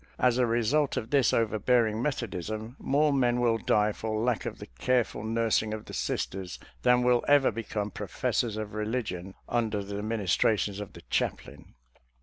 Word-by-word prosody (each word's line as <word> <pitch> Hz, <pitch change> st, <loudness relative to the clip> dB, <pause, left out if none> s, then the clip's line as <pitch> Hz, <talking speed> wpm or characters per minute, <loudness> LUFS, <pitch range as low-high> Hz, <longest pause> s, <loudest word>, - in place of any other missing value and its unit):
As 125 Hz, -1 st, +3 dB
a 125 Hz, -, +3 dB
result 120 Hz, +6 st, +1 dB
of 110 Hz, -, -4 dB
this 140 Hz, -4 st, +4 dB
overbearing 110 Hz, 0 st, +2 dB
Methodism, 110 Hz, -, -3 dB
more 145 Hz, +1 st, +2 dB
men 125 Hz, -3 st, +2 dB
will 115 Hz, -2 st, +2 dB
die 105 Hz, 0 st, +2 dB
for 110 Hz, +1 st, -3 dB
lack 120 Hz, -2 st, 0 dB
of -, -, -5 dB
the -, -, -8 dB
careful 120 Hz, -, -1 dB
nursing 110 Hz, -1 st, +1 dB
of 110 Hz, -, -9 dB
the -, -, -10 dB
Sisters 95 Hz, -2 st, -3 dB, 0.2 s
than 125 Hz, 0 st, +4 dB
will 125 Hz, -1 st, +3 dB
ever 145 Hz, -2 st, +5 dB
become 105 Hz, -2 st, -4 dB
professors 110 Hz, +3 st, -2 dB
of 110 Hz, -1 st, -5 dB
religion 105 Hz, -4 st, -3 dB
under 110 Hz, -4 st, 0 dB
the 100 Hz, +1 st, -5 dB
ministrations 105 Hz, -1 st, +1 dB
of 105 Hz, -2 st, -7 dB
the -, -, -11 dB
chaplain. -, -, -3 dB
110 Hz, 160 wpm, -28 LUFS, 105-125 Hz, 0.2 s, ever